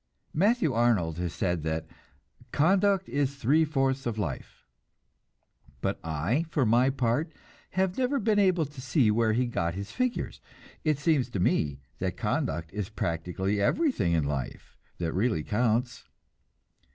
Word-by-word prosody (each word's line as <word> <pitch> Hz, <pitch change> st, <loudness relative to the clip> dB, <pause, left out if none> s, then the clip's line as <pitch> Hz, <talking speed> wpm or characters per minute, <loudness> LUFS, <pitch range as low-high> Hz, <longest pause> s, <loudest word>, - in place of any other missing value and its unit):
Matthew 185 Hz, -, +2 dB
Arnold 105 Hz, -9 st, +2 dB
has 90 Hz, -2 st, -2 dB
said 90 Hz, -3 st, -1 dB
that 80 Hz, +1 st, -2 dB, 0.7 s
"Conduct 195 Hz, +4 st, +3 dB
is 140 Hz, -1 st, -1 dB
three 140 Hz, +5 st, +3 dB
fourths 135 Hz, -4 st, 0 dB
of 115 Hz, -2 st, -2 dB
life"; 85 Hz, -11 st, -5 dB, 1.1 s
but -, -, -2 dB
I, 80 Hz, -, 0 dB
for 145 Hz, -5 st, +1 dB
my 120 Hz, +4 st, +4 dB
part, 135 Hz, +4 st, 0 dB, 0.5 s
have 190 Hz, +3 st, +1 dB
never 260 Hz, +2 st, +1 dB
been 215 Hz, -3 st, +2 dB
able 185 Hz, -5 st, +3 dB
to 145 Hz, -2 st, -10 dB
see 130 Hz, -4 st, +3 dB
where 110 Hz, 0 st, +2 dB
he 125 Hz, +3 st, +2 dB
got 85 Hz, -8 st, -2 dB
his 100 Hz, +1 st, -6 dB
figures. 255 Hz, -1 st, -2 dB, 0.4 s
It 155 Hz, -3 st, +2 dB
seems 145 Hz, -4 st, +1 dB
to 100 Hz, -, -3 dB
me 70 Hz, -6 st, +1 dB, 0.2 s
that -, -, -2 dB
conduct 80 Hz, +2 st, -2 dB
is 105 Hz, -2 st, -3 dB
practically 95 Hz, +2 st, -2 dB
everything 250 Hz, -, +2 dB
in 80 Hz, -2 st, +2 dB
life 70 Hz, -2 st, -4 dB, 0.2 s
that 85 Hz, -2 st, -2 dB
really 95 Hz, -5 st, +1 dB
counts. 120 Hz, +4 st, 0 dB
120 Hz, 145 wpm, -28 LUFS, -, 1.1 s, my